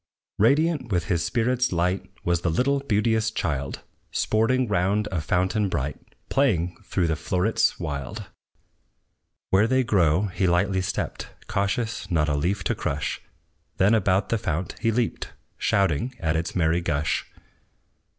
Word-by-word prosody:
Radiant 140 +2 +2
with 90 -3 +1
his 85 -3 +1
spirit's 125 +1 +1
light 90 +2 0
Was 85 -1 +1
the 85 - 0
little 130 - +2
beauteous 110 -3 +1
child, 70 -10 -3 0.3
Sporting 125 +4 +1
round 105 +2 +1
a 85 -4 -1
fountain 95 +6 +1
bright, 70 -4 -2 0.3
Playing 90 -11 +1
through 90 - 0
the 80 -1 +1
flowerets 90 +6 +1
wild. 70 -6 -4 1.3
Where 100 +3 +4
they 130 +2 +2
grow 90 -6 +3
he 95 -1 0
lightly 95 +2 +2
stepped, 95 - -3 0.2
Cautious 100 +1 -2
not 80 -4 +2
a 75 - +1
leaf 90 +7 -1
to - - +1
crush; 70 +1 -3 0.6
Then 100 +4 +4
about 100 -3 +2
the 115 - +1
fount 85 0 -3
he 115 - +1
leaped, 115 0 -2 0.3
Shouting 100 - +1
at 80 -3 0
its 80 +1 -2
merry 85 -1 +2
gush. 80 -3 -1
95 Hz, 140 wpm, -25 LUFS, 85-110 Hz, 1.3 s, Where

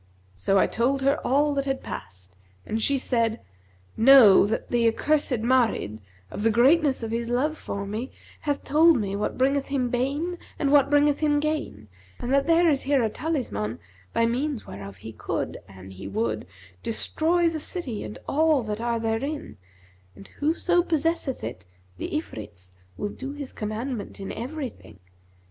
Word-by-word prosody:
So 95 - +1
I - - +5
told 265 +4 0
her 275 +1 +3
all 290 +3 +2
that 275 -1 -1
had 270 -1 -2
passed, 95 0 -9 0.3
and 220 +1 -2
she 280 +4 +3
said, 230 -3 0 0.6
'Know, 225 -5 +8
that 220 - -3
the 235 -1 +3
accursed 255 0 +1
Marid, 230 - +1 0.3
of - - -5
the 225 - +3
greatness 265 +4 +4
of 225 - -3
his 230 0 -2
love 275 +6 +1
for 200 -9 -5
me, 220 +6 -4 0.3
hath 290 -2 -2
told 315 +2 +5
me 200 -2 -2
what 205 - -2
bringeth 275 +2 +1
him 255 -3 -1
bane 290 +8 -1 0.2
and 280 -2 0
what 280 -1 +5
bringeth 290 0 +3
him 295 -1 +2
gain; 295 - -3 0.3
and 250 - -2
that 275 +2 +3
there 335 +1 +5
is 285 -4 +2
here 275 -2 +2
a 220 - 0
talisman 230 - -3 0.3
by 230 - +2
means 255 +2 -1
whereof 100 0 -9
he 110 +5 -9
could, - - -3
an 95 0 -12
he 95 +1 -8
would, 110 -1 -2 0.3
destroy 335 +9 +1
the 325 -1 -1
city 295 - -4
and 105 0 -7
all 310 -3 +3
that 215 0 -4
are 235 -1 0
therein; 230 +7 -3 0.6
and 100 +1 -13
whoso 345 +4 +2
possesseth 325 -4 -1
it, 90 - -6 0.4
the - - -3
Ifrits 105 - -6 0.3
will 205 - -2
do 270 +6 -7
his 285 -2 -7
commandment 220 +1 -4
in 195 - -5
everything. 255 - -6
255 Hz, 165 wpm, -25 LUFS, 210-290 Hz, 0.6 s, Know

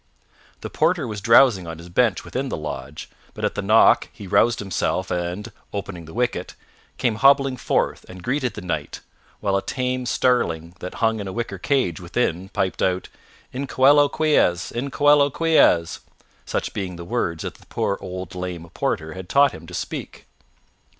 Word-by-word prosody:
The - - -5
porter 160 -3 +1
was 105 -2 -5
drowsing 115 -4 +5
on 80 -1 -6
his 85 +1 -11
bench 105 +3 +1
within 135 +1 -3
the - - -3
lodge, 75 -2 -6 0.3
but - - -2
at - - 0
the - - -3
knock - - +5
he 100 - -11
roused 115 +5 +3
himself 95 -1 -2
and, 90 +3 -3 0.2
opening 95 -4 -5
the 80 - -12
wicket, 120 -7 -2 0.4
came 115 -3 0
hobbling 135 +1 +4
forth - - -1
and 90 -1 -10
greeted 130 -1 -1
the 105 - -6
Knight, 90 - -4 0.4
while 100 -2 +1
a 100 - +1
tame 125 +1 -2
starling 85 -12 +1
that 90 - -7
hung 110 -1 +1
in 100 - -5
a - - -4
wicker 110 -3 -4
cage 125 - 0
within 90 0 -2
piped 95 -1 -2
out, 90 -1 0 0.4
"In 135 +2 -3
coelo 145 +3 +5
quies! 120 - +2
In 125 +4 -3
coelo 145 +1 +4
quies!" 155 - +3 0.5
such - - -2
being 95 -3 -4
the 85 0 -8
words 85 -6 -2
that - - -4
the - - -21
poor 100 - -1
old 90 -1 -6
lame 90 -2 -5
porter 80 0 -2
had 95 -1 -9
taught 140 -1 +5
him - - -11
to - - -11
speak. - - -6
100 Hz, 175 wpm, -22 LUFS, 90-130 Hz, 0.5 s, drowsing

